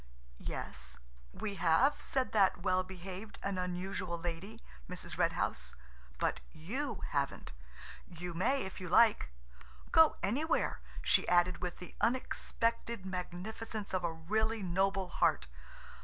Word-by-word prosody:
"Yes–we - - -7
have," 175 - +4
said 260 -1 0
that 195 -4 +3
well 185 -1 +3
behaved 190 +3 -8
and 195 -1 -1
unusual 180 0 -2
lady–Mrs. 170 - -7
Red - - +2
House, - - -2 0.4
"but - - 0
you 220 - -4
haven't. 140 - -2 0.5
You 175 0 -6
may 265 +11 +2
if 190 0 -7
you 180 - -5
like. 210 - +5 0.6
Go 320 -1 +7
anywhere," 290 - +1 0.2
she - - +4
added 175 +1 +4
with 180 -1 -3
the 180 - -10
unexpected 230 -3 0
magnificence 195 +4 -5
of 185 -1 +1
a 170 - +1
really 215 +7 0
noble 190 +1 +1
heart. - - +2
185 Hz, 120 wpm, -34 LUFS, 175-220 Hz, 0.6 s, Go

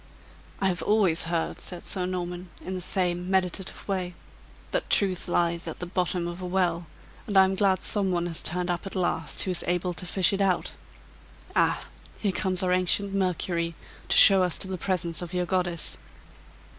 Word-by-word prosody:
"I 195 - +1
have 180 -2 -1
always 195 -7 +2
heard," 165 0 -2
said 175 -2 -8
Sir 185 -2 -1
Norman, 180 0 -5 0.2
in 185 - -4
the 185 - -4
same 180 -1 -1
meditative 190 0 -1
way, 185 -3 -3 0.6
"that - - -2
truth 190 -3 +1
lies 170 -1 0
at 160 - -6
the 180 - -6
bottom 180 -1 -2
of 175 +1 -7
a - - -5
well, 175 -2 -1 0.4
and 205 -3 0
I 190 - +9
am 190 0 +1
glad 190 -1 +1
some 200 -3 +9
one 175 -1 -1
has 165 -2 -4
turned 180 +2 -1
up 175 +2 -4
at 195 - -6
last 175 -4 -1
who 190 - -2
is 180 - -1
able 180 0 -1
to 180 +1 -4
fish 190 +2 +2
it 195 - -1
out. 190 -2 0 0.8
Ah! - - +1 0.3
Here 205 - -1
comes 185 0 0
our 180 - +1
ancient 185 +2 +1
Mercury 175 -3 -1 0.3
to - - +4
show 195 -1 +8
us 180 -2 +1
to - - -1
the 185 -1 -5
presence 175 -3 -2
of 175 +1 -7
your 180 0 0
goddess." 175 -2 -1
180 Hz, 195 wpm, -26 LUFS, 175-190 Hz, 0.8 s, I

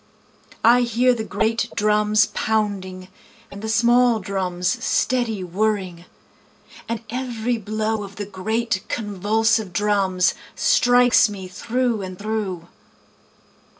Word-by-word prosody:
I 240 +2 +6
hear 245 +1 +2
the 225 -2 -3
great 220 +3 -1
drums 210 0 +3
pounding, 195 -4 -2 0.4
And 200 - -9
the 220 - -4
small 240 +1 +3
drums 185 -2 -2
steady 235 -6 0
whirring, 185 -2 -2 0.8
And 230 -1 -3
every 245 -2 -2
blow 215 +1 -2
of 200 0 -10
the 205 - -5
great 205 +1 -2
convulsive 215 0 0
drums, 195 -2 +1 0.2
Strikes 245 - +4
me 195 -2 -7
through 235 +4 -1
and 185 -1 -7
through. 205 -5 -4
215 Hz, 110 wpm, -22 LUFS, 190-230 Hz, 0.8 s, I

